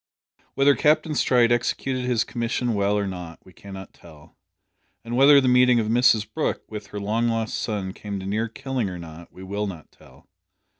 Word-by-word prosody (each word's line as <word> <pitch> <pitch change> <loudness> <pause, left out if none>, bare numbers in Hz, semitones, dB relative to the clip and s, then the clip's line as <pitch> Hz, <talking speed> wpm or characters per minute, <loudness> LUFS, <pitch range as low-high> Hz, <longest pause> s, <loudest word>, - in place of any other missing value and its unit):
Whether 140 +1 +5
Captain 155 +1 +2
Stride 125 -4 +3
executed 125 +2 -1
his 120 -2 +1
commission 120 0 -2
well 100 0 +1
or 100 - -1
not 90 -3 -7
we 95 - -18
cannot 95 +1 -11
tell, 80 -4 -17 0.7
and 120 +1 -4
whether 140 +2 +7
the 130 - 0
meeting 125 -1 +5
of 110 -1 -1
Mrs 115 -2 +3
Brooke 110 - -3
with 105 -1 -8
her 105 - -7
long 110 +4 0
lost 115 -1 -2
son 100 -3 -3
came 100 -1 -6
to 95 - -8
near 110 +4 -1
killing 125 -2 -3
or 90 - -7
not 85 0 -11
we 95 - -12
will 100 +2 -3
not 85 -6 -9
tell. - - -20
110 Hz, 190 wpm, -23 LUFS, 95-125 Hz, 0.7 s, whether